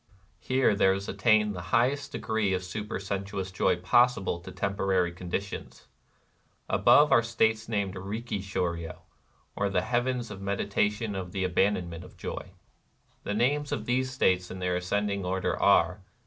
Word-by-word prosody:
Here 130 -3 +2
there 95 -1 +3
is 100 +1 -5
attained 105 +1 +3
the 90 - -5
highest 130 +7 +1
degree 110 -3 -1
of 90 - -3
supersensuous 100 0 -4
joy 95 0 +2
possible 95 0 +2
to 85 - -10
tem 100 0 -2
porary 95 -3 +1
conditions. 95 +3 -5 0.8
Above 150 +1 +5
are 115 - +6
the 115 - -6
states 110 -1 +1
named 100 -4 -1
Itihi 105 +3 -4
shdryo^ 85 -4 -3 0.6
or 100 - 0
the 100 - +1
Heavens 120 0 -1
of 100 - -7
the 100 - -8
Medita 100 +1 +1
tion 105 0 -4
of 95 -2 -5
the 95 - -1
Abandonment 90 -2 0
of - - -15
Joy. - - -6 0.7
The 105 - -2
names 145 +6 +1
of - - -2
these 130 +1 0
states 95 -8 +1
in 95 - -7
their 90 -1 -1
ascending 100 +2 -1
order 95 +1 -1
are. 90 +4 +3
100 Hz, 160 wpm, -28 LUFS, 95-110 Hz, 0.8 s, are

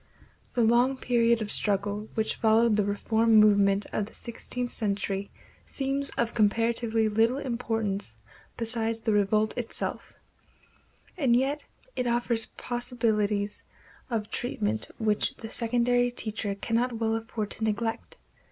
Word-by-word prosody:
The 240 - +3
long 240 +4 +3
period 235 -2 +2
of 205 - -3
struggle 205 +1 0
which 220 -1 -1
followed 225 0 +4
the 210 - +2
reform 220 +3 +1
movement 200 -2 +5
of 205 - -1
the - - -15
sixteenth 245 +1 -5
century 200 -2 -2 0.4
seems 275 0 0
of 235 -1 0
comparatively 225 +1 +1
little 225 +4 +2
importance 225 - -2 0.4
beside 230 -1 0
the 225 -1 -1
revolt 210 +1 +2
itself; 240 -2 -2 1.0
and 255 -6 +3
yet 275 +4 0 0.3
it 250 - -1
offers 235 -1 +1
possibilities 220 -4 -1 0.5
of 220 -3 -3
treatment 110 - -2
which 215 -1 0
the 225 -1 -9
secondary 245 +1 +3
teacher 215 -4 -3
cannot 235 +4 -1
well 225 0 0
afford 225 -2 -4
to 220 - -2
neglect. 220 +1 -2
225 Hz, 125 wpm, -27 LUFS, 210-240 Hz, 1.0 s, movement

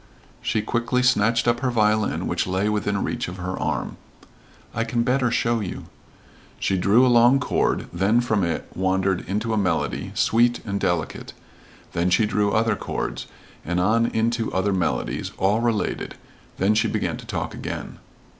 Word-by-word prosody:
She 110 - 0
quickly 120 +2 0
snatched 115 -2 +3
up 120 0 +2
her 130 0 0
violin 110 -2 +1
which - - -1
lay 95 +2 0
within 105 -1 -1
reach 120 0 -2
of 90 +1 -7
her 90 +1 -4
arm. - - -2 0.8
"I 115 - 0
can 115 +1 0
better 125 0 +2
show 115 0 +1
you." 100 -4 -5 0.8
She 95 - 0
drew 100 +7 +4
a - - +4
long 120 +2 +5
chord, 125 - 0
then 100 +7 +2
from 110 -5 +1
it 85 -1 -2
wandered 95 0 0
into 110 +3 -1
a 110 - +1
melody, 90 -5 -1
sweet 120 +1 +3
and 100 -1 -2
delicate; 85 -4 -2 0.6
then 85 +2 +1
she 105 +4 +3
drew 105 -1 +1
other 115 +2 +2
chords, - - -4 0.4
and 90 +2 -1
on 115 +5 +3
into 115 0 0
other 95 +2 0
melodies, 90 -2 -2
all 100 +4 +2
related; 115 -3 -1 0.4
then 100 +3 +3
she 110 - +2
began - - -2
to - - -12
talk - - -3
again. - - -6
110 Hz, 165 wpm, -23 LUFS, 95-120 Hz, 0.8 s, long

